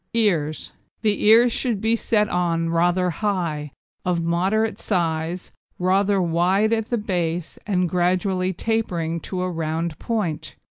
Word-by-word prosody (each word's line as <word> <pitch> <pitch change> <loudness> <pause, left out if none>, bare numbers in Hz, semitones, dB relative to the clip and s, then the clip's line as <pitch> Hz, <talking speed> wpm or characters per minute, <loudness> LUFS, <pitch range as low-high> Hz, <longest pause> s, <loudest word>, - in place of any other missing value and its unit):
EARS 165 -9 +1 0.3
The 210 -1 +1
ears 230 +3 +7
should 230 -3 -1
be 225 +3 +2
set 215 -2 +1
on 165 -3 0
rather 175 +2 +2
high, 165 -6 -2 0.3
of 170 -2 0
moderate 195 +6 +1
size, 170 -2 -2 0.3
rather 195 +2 +2
wide 185 +5 +2
at 225 -1 -1
the 240 - +1
base, 175 -5 -2
and 180 -3 +1
gradually 185 +2 +1
tapering 175 -5 -1
to 180 +2 -4
a 185 - -2
round 165 0 -3
point. 205 -10 -3
180 Hz, 135 wpm, -23 LUFS, 170-210 Hz, 0.3 s, ears